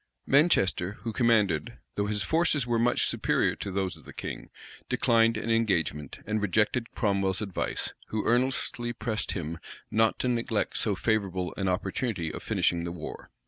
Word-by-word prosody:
Manchester, 105 - +3
who 115 - -3
commanded, 110 -4 +2 0.2
though 100 0 -1
his 105 -1 0
forces 160 -5 +2
were 120 -1 +1
much 120 +1 +3
superior - - +1
to 100 - -5
those 95 -1 -1
of - - -16
the - - -11
king, - - -6 0.4
declined 115 -2 +3
an 115 +2 -2
engagement, 85 - 0
and 110 0 -1
rejected 105 +4 +1
Cromwell's 100 -3 +1
advice, 100 -4 -3
who 110 -1 -2
earnestly 120 -1 +1
pressed 110 -1 -2
him 85 -2 -4 0.3
not 110 0 +3
to - - -1
neglect 115 -3 0
so 105 -3 0
favorable 95 -4 0
an 95 - -1
opportunity 95 -2 -1
of - - -6
finishing 85 -1 +1
the 85 - -3
war. 85 -3 -8
105 Hz, 160 wpm, -28 LUFS, 95-115 Hz, 0.4 s, Manchester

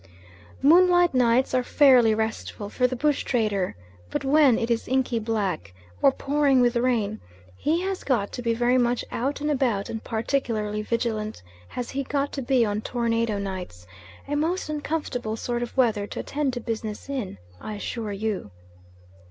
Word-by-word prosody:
Moonlight 350 +2 +6
nights 250 0 +3
are 255 - +3
fairly 250 -4 +5
restful 220 -2 -3
for 250 - +2
the 255 - -4
bush 290 +3 +1
trader, 210 - 0 0.3
but - - -3
when 275 -4 +5
it 230 +1 -1
is 230 - 0
inky 255 -2 +1
black, 200 - -2 0.3
or 275 - +6
pouring 275 -1 +2
with 245 0 +3
rain, 235 -4 0 0.3
he 325 - 0
has 385 0 -3
got 230 -7 0
to 245 - -5
be 230 -1 0
very 245 +2 +3
much 245 0 +1
out 275 +5 -2
and 300 +1 0
about, 245 -8 0
and 225 - -5
particularly 220 -3 -1
vigilant 220 - -2 0.2
has 245 - -5
he 275 - -2
got 280 +1 -1
to 275 - -4
be 250 -2 +3
on 210 0 -1
tornado 230 -2 0
nights 185 - -6 0.4
a 290 - -3
most 325 +4 -1
uncomfortable 290 -7 -3
sort 240 +1 -2
of 240 +2 -5
weather 220 -5 +2
to - - -6
attend 290 -2 -1
to 245 - -3
business 220 -1 -5
in, 255 - -4 0.2
I 215 - -5
assure 215 +1 -4
you. 205 - -3
240 Hz, 170 wpm, -25 LUFS, 215-275 Hz, 0.4 s, Moonlight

